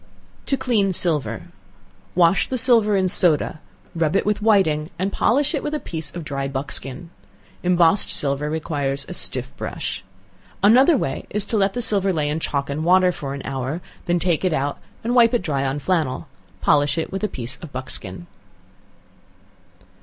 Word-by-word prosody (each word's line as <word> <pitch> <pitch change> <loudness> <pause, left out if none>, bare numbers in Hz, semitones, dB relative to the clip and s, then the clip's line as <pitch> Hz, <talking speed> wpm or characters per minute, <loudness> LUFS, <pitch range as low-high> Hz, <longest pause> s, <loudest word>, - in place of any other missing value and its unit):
To 275 - +1
Clean 210 -8 +1
Silver. 150 - 0 0.7
Wash 175 +1 +4
the 260 - -2
silver 230 -4 +4
in 190 -1 +2
soda 170 -4 +4
water, 155 - -7 0.3
rub 165 -1 0
it - - +2
with 210 0 0
whiting, 170 -8 +2
and 190 +3 -1
polish 285 +5 +2
it 290 - -1
with 300 0 -3
a - - -2
piece 160 - -4
of 170 - -5
dry 140 -2 -3
buckskin. 135 +4 -3 0.5
Embossed 175 +1 +3
silver 140 +1 0
requires 145 -3 -2
a - - -6
stiff 65 - -2
brush. - - -4 0.6
Another 260 +9 +6
way - - -3
is 210 0 -1
to 225 - -3
let 195 -2 +2
the 245 - -2
silver 195 -3 +1
lay 150 -4 -1
in 150 +2 -1
chalk 140 -3 -2
and 145 +2 -3
water 180 +1 +4
for 140 -5 -6
an 140 - -7
hour, 135 +4 -3 0.3
then 175 0 +1
take 175 -1 0
it 185 -3 +1
out, 145 -1 -1 0.2
and 235 +2 -1
wipe 240 -1 +5
it 235 - 0
dry 140 -5 -1
on 135 +1 -1
flannel; 150 -3 -1 0.3
polish 145 0 +3
it 165 - -2
with 195 +2 -4
a - - +2
piece 125 - -5
of 165 -5 -11
buckskin. 100 -8 -4
165 Hz, 180 wpm, -22 LUFS, 140-200 Hz, 0.7 s, Another